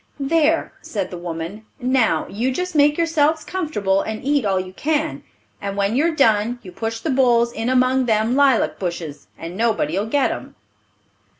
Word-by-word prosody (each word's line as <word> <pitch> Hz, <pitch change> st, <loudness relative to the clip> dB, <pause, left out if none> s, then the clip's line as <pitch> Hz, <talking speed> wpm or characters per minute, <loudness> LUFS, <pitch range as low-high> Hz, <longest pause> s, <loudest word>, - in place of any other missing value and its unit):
"There," 320 Hz, +3 st, +1 dB
said -, -, -4 dB
the 180 Hz, -, -6 dB
woman, 175 Hz, +5 st, -6 dB
"now, 255 Hz, -2 st, +2 dB
you 235 Hz, +6 st, -1 dB
just 360 Hz, +7 st, -3 dB
make 295 Hz, -1 st, +4 dB
yourselves 315 Hz, -2 st, +2 dB
comfortable, 295 Hz, -, -1 dB
and 220 Hz, 0 st, -5 dB
eat 285 Hz, -4 st, +2 dB
all 195 Hz, -2 st, +1 dB
you 185 Hz, 0 st, -6 dB
can; 310 Hz, +6 st, -1 dB, 0.4 s
and 200 Hz, 0 st, -4 dB
when 200 Hz, +3 st, +1 dB
you're 320 Hz, +4 st, +2 dB
done, 230 Hz, -3 st, +3 dB
you 185 Hz, -, -10 dB
push 225 Hz, +4 st, -4 dB
the 315 Hz, -, -2 dB
bowls 240 Hz, -3 st, +3 dB
in 225 Hz, +2 st, -2 dB
among 255 Hz, 0 st, +2 dB
them 220 Hz, +2 st, +2 dB
lilac 275 Hz, -4 st, +3 dB
bushes, 170 Hz, -5 st, -5 dB
and 170 Hz, +2 st, -7 dB
nobody'll 210 Hz, -3 st, 0 dB
get 275 Hz, +4 st, +1 dB
'em." 120 Hz, -, -7 dB
235 Hz, 170 wpm, -21 LUFS, 200-290 Hz, 0.4 s, make